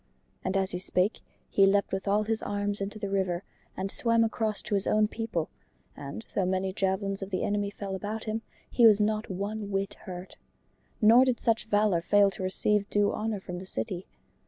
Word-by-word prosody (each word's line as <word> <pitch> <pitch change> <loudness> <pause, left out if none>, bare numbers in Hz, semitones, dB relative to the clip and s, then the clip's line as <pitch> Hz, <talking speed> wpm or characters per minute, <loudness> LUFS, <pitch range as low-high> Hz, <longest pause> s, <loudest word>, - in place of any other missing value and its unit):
And 185 +1 0
as 190 0 0
he 180 - -2
spake 185 +3 0 0.3
he 195 -1 +4
leapt 200 0 +2
with 190 +1 -2
all 205 +2 +3
his 220 +1 0
arms 205 0 -2
into 200 +2 -4
the 200 -2 -4
river 190 -2 0 0.3
and 195 +1 -2
swam 230 -1 +3
across 220 -2 -1
to 210 - -4
his 200 -1 +1
own 215 0 +3
people, 220 -8 -3 0.4
and 140 +10 -7
though 195 - +1
many 190 0 0
javelins 195 +1 -1
of 195 - -5
the 185 - -1
enemy 205 0 0
fell 200 -1 -6
about 210 +3 -4
him, 220 +1 -3 0.3
he 235 -2 +5
was 210 -2 +6
not 215 +1 0
one 200 +2 -4
whit 195 0 -1
hurt. 180 0 -8 0.7
Nor 235 +4 +8
did 255 -2 0
such 225 -1 +1
valor 205 -5 +2
fail 200 +3 +4
to 195 - -8
receive 200 +2 +1
due 205 0 +2
honor 215 -1 -2
from 180 -1 -6
the 190 - -8
city. 175 +7 -4
200 Hz, 200 wpm, -28 LUFS, 190-215 Hz, 0.7 s, Nor